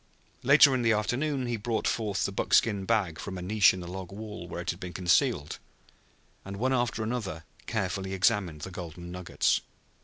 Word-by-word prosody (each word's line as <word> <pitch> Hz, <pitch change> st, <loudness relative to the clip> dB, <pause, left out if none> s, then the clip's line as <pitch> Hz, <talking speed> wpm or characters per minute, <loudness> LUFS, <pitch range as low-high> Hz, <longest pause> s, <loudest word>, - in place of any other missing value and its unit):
Later 140 Hz, +1 st, +7 dB
in 130 Hz, -, +1 dB
the 115 Hz, -1 st, +3 dB
afternoon 130 Hz, +6 st, -1 dB
he 120 Hz, -1 st, -2 dB
brought 110 Hz, +1 st, -1 dB
forth 105 Hz, -4 st, 0 dB
the -, -, -2 dB
buckskin 100 Hz, 0 st, +2 dB
bag 90 Hz, -7 st, 0 dB
from 95 Hz, +5 st, -6 dB
a -, -, -5 dB
niche 105 Hz, +2 st, +5 dB
in 95 Hz, -, -6 dB
the 90 Hz, -, -7 dB
log 95 Hz, 0 st, -7 dB
wall 105 Hz, +1 st, -7 dB
where -, -, -6 dB
it -, -, -1 dB
had -, -, -10 dB
been 90 Hz, -1 st, -7 dB
concealed, 90 Hz, -, +1 dB, 0.8 s
and 100 Hz, 0 st, -7 dB
one 130 Hz, +5 st, +1 dB
after 120 Hz, -3 st, 0 dB
another 110 Hz, -9 st, -3 dB, 0.2 s
carefully 95 Hz, -2 st, -2 dB
examined 95 Hz, -6 st, +1 dB
the 95 Hz, -, -6 dB
golden 85 Hz, -1 st, -8 dB
nuggets. 90 Hz, -1 st, 0 dB
100 Hz, 185 wpm, -28 LUFS, 90-115 Hz, 0.8 s, Later